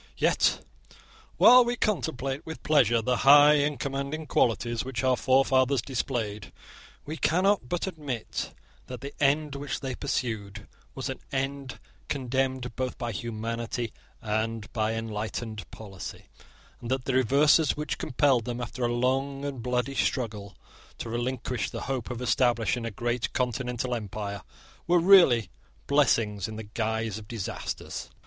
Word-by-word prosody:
Yet - - +2 0.7
while 250 0 +8
we 240 +1 -1
contemplate 155 - -1
with 160 0 -8
pleasure 120 -7 +3
the 125 +2 +1
high 145 +2 +8
and 145 -2 0
commanding 140 +4 -3
qualities 120 -3 +1
which 130 -1 -4
our 130 -1 +4
forefathers 130 +1 +3
displayed, 115 -5 -3 0.5
we 155 +2 -5
cannot 185 -5 +2
but 175 - -1
admit 145 - -4 0.4
that 125 -2 -7
the 140 - -7
end 145 +1 +2
which 140 +1 -4
they 135 -2 -4
pursued 110 -7 -3 0.3
was - - -4
an - - -5
end 135 -1 -3 0.3
condemned 130 -2 -1
both 130 -1 -3
by 120 -1 -3
humanity 115 +1 -4 0.3
and 110 -1 -2
by 110 -1 0
enlightened 110 0 -4
policy, 100 -4 -9 0.5
and 120 - -7
that 130 -1 -1
the 135 - -1
reverses 140 +5 +4
which 150 0 -3
compelled 130 -4 +2
them, 120 -1 -4
after 120 +1 -5
a - - +3
long 135 +3 0
and 135 -4 -4
bloody 125 +2 -1
struggle, 110 -7 -2 0.4
to - - -6
relinquish 120 0 -2
the - - -6
hope 130 -4 -3
of 125 0 -4
establishing 120 -2 +1
a - - -2
great 120 +3 -2
continental 125 0 -1
empire, 105 -2 -4 0.5
were 175 +1 +5
really 165 - +6 0.3
blessings 115 -9 +2
in 110 - -7
the 110 - -6
guise 110 0 -2
of 105 - -13
disasters. 110 -5 -5
125 Hz, 140 wpm, -27 LUFS, 115-140 Hz, 0.7 s, while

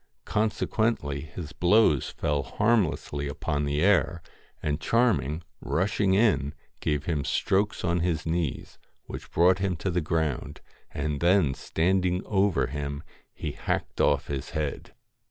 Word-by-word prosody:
Consequently 110 -8 0
his 75 0 -8
blows 90 - +3
fell 75 -1 -1
harmlessly 90 - 0
upon 70 +1 -2
the 70 +2 0
air, 90 -4 +3 0.4
and 75 +1 -1
Charming, 95 - +1 0.2
rushing 95 +1 +1
in, 95 - +2 0.2
gave 75 -1 -1
him 75 -5 -1
strokes 100 +8 0
on 85 0 +1
his 85 -2 -1
knees, 80 -3 -2 0.2
which - - -8
brought 90 +2 +4
him 95 -2 0
to 90 +3 -2
the 90 0 +1
ground, 80 -4 -2 0.3
and 75 0 -3
then 85 -4 +3
standing 90 +4 0
over 95 -9 +2
him, 70 +2 -4 0.3
he - - -5
hacked - - -2
off - - +3
his 70 -2 -4
head. 75 -2 -4
85 Hz, 135 wpm, -27 LUFS, 75-95 Hz, 0.4 s, brought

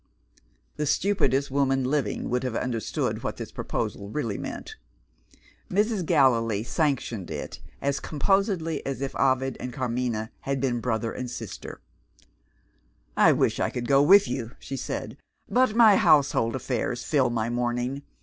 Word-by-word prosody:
The 150 - -1
stupidest 145 -5 +1
woman 135 -1 +2
living 140 +2 -1
would 125 +1 0
have 125 -3 -3
understood 115 -4 -2
what - - -4
this - - -7
proposal 100 0 -4
really 115 -4 -3
meant. - - -6 0.9
Mrs. 210 0 +1
Gallilee 115 -8 +3
sanctioned 120 - -1
it - - -6 0.2
as 140 0 0
composedly 165 0 0
as 135 -1 -4
if 135 - -3
Ovid 130 -1 +1
and 125 - -5
Carmina 120 -3 -2
had 135 0 -2
been 125 -2 0
brother 115 -1 -1
and 125 -1 -5
sister. - - -8 1.3
"I - - +6
wish - - +1
I - - +1
could 120 -1 -4
go 140 0 +5
with 195 +7 +7
you," 120 -1 -4
she 135 - -7
said, 130 - -5 0.3
"but 250 -3 +2
my 220 -4 +7
household 140 -7 +3
affairs 125 -1 -2
fill 140 -5 +2
my 115 -1 -1
morning. 125 +3 -1
130 Hz, 145 wpm, -26 LUFS, 120-145 Hz, 1.3 s, with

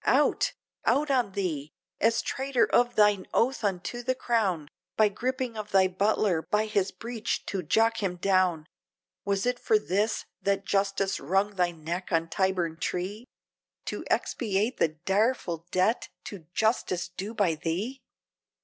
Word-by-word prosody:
Out! - - +3 0.3
out 295 0 +2
on 245 -7 +1
thee! 155 -7 -3 0.3
as 225 +1 +2
traitor 265 -2 +1
of 240 0 +2
thine 210 -2 +4
oath 250 +1 +2
unto 200 +4 -2
the 255 +2 0
crown! 205 - 0 0.3
By 215 -1 +5
gripping 255 +3 -2
of 210 -1 -5
thy 190 -2 +5
butler, 190 -2 +1
by 210 +5 0
his 205 -3 +1
breech 230 +3 -4
to 195 - -2
jock 225 +7 +2
him 185 -3 -1
down, 180 -3 +2 0.6
Was 200 0 0
it 245 0 0
for 440 - +3
this! 210 - 0 0.2
that 200 0 0
justice 195 -1 0
wrung 195 +7 +1
thy 180 -2 +2
neck 170 +3 -5
on 165 -1 +1
Tyburn 185 -4 0
tree, 190 - -3 0.6
To - - -4
expiate 215 +1 0
the - - +4 0.2
direful 190 -5 +1
debt 185 +7 +1
to 180 -7 -9
justice 215 -5 +1
due 195 +5 -6
by 195 -6 +2
thee? 185 - -3
200 Hz, 150 wpm, -28 LUFS, 180-225 Hz, 0.6 s, By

